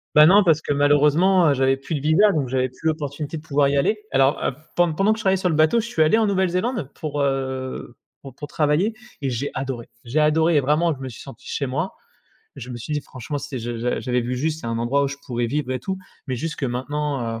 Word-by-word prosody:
Ben 150 Hz, 0 st, +9 dB
non, 200 Hz, +5 st, +7 dB
parce 160 Hz, -4 st, +3 dB
que 145 Hz, -, -1 dB
malheureusement, 150 Hz, +5 st, +4 dB
heu, -, -, +4 dB
j'avais 135 Hz, 0 st, +2 dB
plus 140 Hz, +4 st, -6 dB
de -, -, -2 dB
visa 160 Hz, +8 st, +4 dB
donc 150 Hz, -7 st, -1 dB
j'avais 130 Hz, 0 st, 0 dB
plus 130 Hz, +6 st, -5 dB
l'opportunité 150 Hz, 0 st, -3 dB
de -, -, -8 dB
pouvoir 145 Hz, -2 st, +2 dB
y 140 Hz, -, +1 dB
aller. 210 Hz, +10 st, +1 dB
Alors, 135 Hz, +1 st, +2 dB
heu, -, -, 0 dB, 0.2 s
pendant 175 Hz, -2 st, +3 dB
pendant 200 Hz, +6 st, +3 dB
que 220 Hz, -, -6 dB
je -, -, -4 dB
travaillais 190 Hz, -1 st, +3 dB
sur 185 Hz, -1 st, 0 dB
le 160 Hz, -, 0 dB
bateau, 155 Hz, +9 st, +4 dB
je 230 Hz, -, -3 dB
suis 165 Hz, -, -1 dB
allé 155 Hz, +7 st, +5 dB
en 225 Hz, -, +3 dB
Nouvelle-Zélande, 190 Hz, -, 0 dB
pour 145 Hz, -2 st, -3 dB
heu, 130 Hz, -2 st, -3 dB, 0.3 s
pour 135 Hz, -2 st, -10 dB
pour 145 Hz, +3 st, -8 dB
travailler 155 Hz, +8 st, +1 dB, 0.3 s
et 135 Hz, -, -1 dB
j'ai 130 Hz, +3 st, -3 dB
adoré 130 Hz, -3 st, -4 dB, 0.2 s
J'ai 125 Hz, +6 st, 0 dB
adoré 160 Hz, +2 st, +3 dB
et -, -, +6 dB
vraiment 155 Hz, +5 st, +2 dB
je -, -, -16 dB
me 130 Hz, -1 st, -5 dB
suis 115 Hz, -, -11 dB
senti 135 Hz, -, -12 dB
chez 140 Hz, -, -2 dB
moi. 155 Hz, +8 st, -2 dB, 0.6 s
Je 125 Hz, +1 st, -8 dB
me 120 Hz, -, -5 dB
suis 120 Hz, +6 st, -6 dB
dit: 150 Hz, -, 0 dB
«Franchement, 130 Hz, +3 st, -6 dB
si 140 Hz, -2 st, -6 dB
j'a 120 Hz, +1 st, -4 dB
j'a 125 Hz, +2 st, -1 dB
j'avais 125 Hz, -1 st, 0 dB
vu 120 Hz, +1 st, -3 dB
juste, 155 Hz, +4 st, -1 dB
c'est 120 Hz, -, -7 dB
un 115 Hz, 0 st, -2 dB
endroit 135 Hz, +5 st, +1 dB
où -, -, 0 dB
je 140 Hz, -, -6 dB
pourrais 120 Hz, -1 st, -1 dB
vivre 140 Hz, +2 st, -2 dB
et 130 Hz, -, -1 dB
tout». 190 Hz, +9 st, -4 dB, 0.3 s
Mais, 130 Hz, -, -2 dB
juste 160 Hz, +6 st, -4 dB
que -, -, -3 dB
maintenant, 130 Hz, -2 st, -3 dB
145 Hz, 260 wpm, -22 LUFS, 130-160 Hz, 0.6 s, Ben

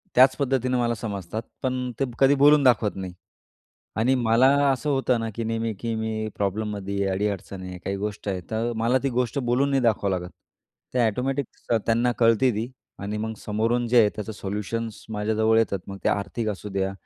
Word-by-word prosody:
त्याच 130 Hz, +1 st, +7 dB
पद्धतीने 130 Hz, -2 st, +1 dB
मला 120 Hz, -1 st, +1 dB
समजतात, 100 Hz, -1 st, -4 dB, 0.2 s
पण 130 Hz, -1 st, -1 dB
ते 135 Hz, -, +2 dB
कधी 135 Hz, +1 st, +5 dB
बोलून 145 Hz, +1 st, +6 dB
दाखवत 120 Hz, -5 st, +3 dB
नाही. 95 Hz, -2 st, -6 dB, 0.8 s
आणि 125 Hz, +4 st, +3 dB
मला 120 Hz, +1 st, +4 dB, 0.2 s
असं 140 Hz, +3 st, -1 dB
होतं 130 Hz, -3 st, +1 dB
ना, 115 Hz, -, -2 dB
की 115 Hz, -, -3 dB
नेहमी 115 Hz, 0 st, -1 dB
की 115 Hz, -1 st, -2 dB
मी 110 Hz, -1 st, -2 dB
प्रॉब्लममध्ये 100 Hz, 0 st, -2 dB
आहे. 100 Hz, -1 st, +1 dB
अडी-अडचण 100 Hz, -1 st, -3 dB
आहे 90 Hz, -1 st, -7 dB
काही 100 Hz, 0 st, -2 dB
गोष्ट 105 Hz, +1 st, -4 dB
आहे. 95 Hz, -2 st, -1 dB
तर 115 Hz, +2 st, -1 dB
मला 120 Hz, +3 st, +2 dB
ती 135 Hz, -, +1 dB
गोष्ट 125 Hz, +1 st, -1 dB
बोलून 130 Hz, +2 st, +1 dB
नाही 135 Hz, -2 st, +2 dB
दाखवावं 110 Hz, -4 st, +2 dB
लागत. 90 Hz, 0 st, -8 dB, 0.6 s
ते 125 Hz, -, +1 dB
ऑटोमॅटिक 130 Hz, +4 st, -1 dB, 0.4 s
त्यांना 120 Hz, +2 st, +2 dB
कळते 115 Hz, +2 st, +4 dB
ती. 115 Hz, +4 st, -3 dB, 0.3 s
आणि 100 Hz, +2 st, -4 dB
मग 110 Hz, +1 st, -3 dB
समोरून 115 Hz, +4 st, 0 dB
जे 120 Hz, +1 st, +5 dB
आहे, 105 Hz, -, +5 dB
त्याचं 110 Hz, +1 st, -5 dB
सोल्युशन्स 105 Hz, +3 st, -4 dB
माझ्याजवळ 110 Hz, +1 st, +2 dB
येतात. 105 Hz, -3 st, +1 dB
मग 100 Hz, 0 st, -7 dB
ते -, -, +4 dB
आर्थिक 110 Hz, +2 st, -1 dB
असुद्या 95 Hz, -1 st, -2 dB
115 Hz, 185 wpm, -25 LUFS, 105-125 Hz, 0.8 s, त्याच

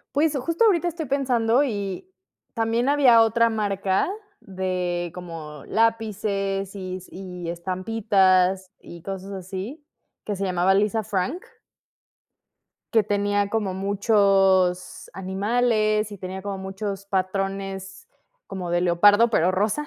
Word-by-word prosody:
Pues, 300 Hz, 0 st, +2 dB
justo 335 Hz, -, 0 dB
ahorita 350 Hz, -5 st, +3 dB
estoy 335 Hz, -2 st, -5 dB
pensando 255 Hz, -2 st, +2 dB
y 205 Hz, -, -4 dB, 0.5 s
También 230 Hz, +2 st, 0 dB
había 255 Hz, -6 st, +6 dB
otra 230 Hz, +1 st, +3 dB
marca 200 Hz, -, 0 dB, 0.3 s
de 180 Hz, -3 st, -3 dB
como 165 Hz, -5 st, -8 dB
lápices, 205 Hz, -3 st, -1 dB
y 185 Hz, -1 st, -5 dB
s 185 Hz, -, -15 dB
y 180 Hz, -2 st, -8 dB
estampitas 185 Hz, 0 st, +1 dB
y 170 Hz, -, -11 dB
cosas 195 Hz, +1 st, -6 dB
así, 195 Hz, -, -6 dB, 0.4 s
que 205 Hz, -2 st, -3 dB
se 195 Hz, -, -2 dB
llamaba 185 Hz, 0 st, +2 dB
Lisa 210 Hz, +2 st, +1 dB
Frank. 215 Hz, -, -2 dB, 1.5 s
Que 225 Hz, -, +5 dB
tenía 205 Hz, 0 st, 0 dB
como 210 Hz, -3 st, -1 dB
muchos 195 Hz, -2 st, +2 dB
animales 215 Hz, +2 st, 0 dB
y 200 Hz, -, -8 dB
tenía 185 Hz, +1 st, -6 dB
como 200 Hz, -1 st, -4 dB
muchos 195 Hz, +1 st, -5 dB
patrones 195 Hz, -, -3 dB, 0.4 s
como 185 Hz, -3 st, -5 dB
de 175 Hz, 0 st, +1 dB
leopardo, 205 Hz, +6 st, +5 dB
pero 180 Hz, -5 st, +3 dB
rosa. 210 Hz, +10 st, 0 dB
195 Hz, 120 wpm, -24 LUFS, 185-225 Hz, 1.5 s, había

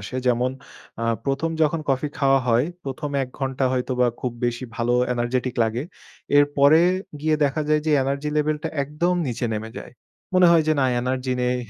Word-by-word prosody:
আসে। 100 Hz, +6 st, -6 dB
যেমন 125 Hz, +1 st, +2 dB, 0.5 s
আ -, -, 0 dB, 0.2 s
১ম 140 Hz, +4 st, -1 dB
যখন 155 Hz, +1 st, +1 dB
কফি 135 Hz, +2 st, +1 dB
খাওয়া 135 Hz, -1 st, +4 dB
হয়, 120 Hz, +2 st, +3 dB, 0.2 s
১ম 140 Hz, +2 st, -4 dB
এক 125 Hz, -, -4 dB
ঘন্টা 135 Hz, -1 st, -1 dB
হয়তোবা 125 Hz, -1 st, +1 dB
খুব 125 Hz, -2 st, -2 dB
বেশি 120 Hz, +1 st, -2 dB
ভালো 120 Hz, 0 st, 0 dB, 0.2 s
এনার্জেটিক 125 Hz, +1 st, -1 dB
লাগে। 115 Hz, +3 st, -1 dB, 0.6 s
এরপরে 145 Hz, +1 st, +5 dB, 0.4 s
গিয়ে 155 Hz, 0 st, +1 dB
দেখা 145 Hz, +2 st, 0 dB
যায় 155 Hz, 0 st, +3 dB
যে -, -, +2 dB
এনার্জি 140 Hz, +2 st, -2 dB
লেভেল 150 Hz, 0 st, +1 dB
টা -, -, 0 dB
একদম 150 Hz, +6 st, -1 dB
নিচে 125 Hz, 0 st, -3 dB
নেমে 110 Hz, +1 st, -5 dB
যায়। -, -, -10 dB, 0.4 s
মনে 185 Hz, -1 st, +6 dB
হয় 165 Hz, -2 st, +5 dB
যে, 155 Hz, -, +5 dB
"না 130 Hz, -, +3 dB, 0.2 s
এনার্জি 130 Hz, 0 st, -1 dB
নেই 125 Hz, 0 st, +1 dB
135 Hz, 180 wpm, -23 LUFS, 125-150 Hz, 0.6 s, মনে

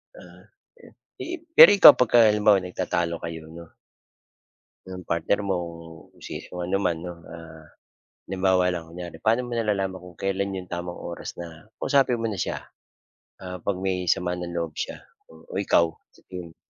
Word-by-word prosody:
Ah, -, -, -15 dB, 0.4 s
eh, -, -, -16 dB, 0.3 s
eh, 350 Hz, 0 st, -6 dB
pero 205 Hz, -, +9 dB
ikaw 195 Hz, -, +11 dB
'pagka 120 Hz, -1 st, +5 dB
halimbawa 105 Hz, -2 st, +3 dB
nagtatalo 85 Hz, -2 st, -2 dB
kayo, 80 Hz, -1 st, -8 dB
'no 85 Hz, 0 st, -13 dB, 1.2 s
Ng 90 Hz, -1 st, -8 dB
partner 85 Hz, +5 st, 0 dB
mo 95 Hz, -, 0 dB, 0.6 s
kung -, -, -24 dB
si -, -, -6 dB
kung 90 Hz, -1 st, -5 dB
ano 95 Hz, +2 st, 0 dB
man 85 Hz, -2 st, 0 dB
'no. 90 Hz, 0 st, -7 dB, 0.2 s
Ah, 80 Hz, -1 st, -12 dB, 0.6 s
halimbawa 95 Hz, -1 st, +1 dB
lang 85 Hz, -2 st, -5 dB
kunyari, 85 Hz, -1 st, -8 dB
pa'no 115 Hz, +3 st, +3 dB
mo 120 Hz, -, -5 dB
nalalaman 100 Hz, -5 st, -1 dB
kung 90 Hz, -3 st, -14 dB
kailan 95 Hz, 0 st, -1 dB
'yong 90 Hz, -1 st, -7 dB
tamang 85 Hz, 0 st, -6 dB
oras 85 Hz, -, -7 dB
na 85 Hz, +5 st, -10 dB
kausapin 135 Hz, -4 st, +2 dB
mo 115 Hz, -, -1 dB
na 100 Hz, -3 st, -5 dB
siya? -, -, -4 dB, 0.8 s
Ah, 90 Hz, 0 st, -6 dB
'pag 100 Hz, +2 st, -2 dB
may 90 Hz, -2 st, -1 dB
sama 90 Hz, 0 st, -3 dB
ng 90 Hz, -1 st, -6 dB
loob 85 Hz, -2 st, -3 dB
siya -, -, -4 dB, 0.3 s
o 80 Hz, +4 st, -9 dB
ikaw, 85 Hz, -4 st, +2 dB, 0.2 s
sa -, -, -21 dB
tingin 90 Hz, -2 st, -7 dB
mo? -, -, -39 dB
90 Hz, 170 wpm, -25 LUFS, 85-100 Hz, 1.2 s, ikaw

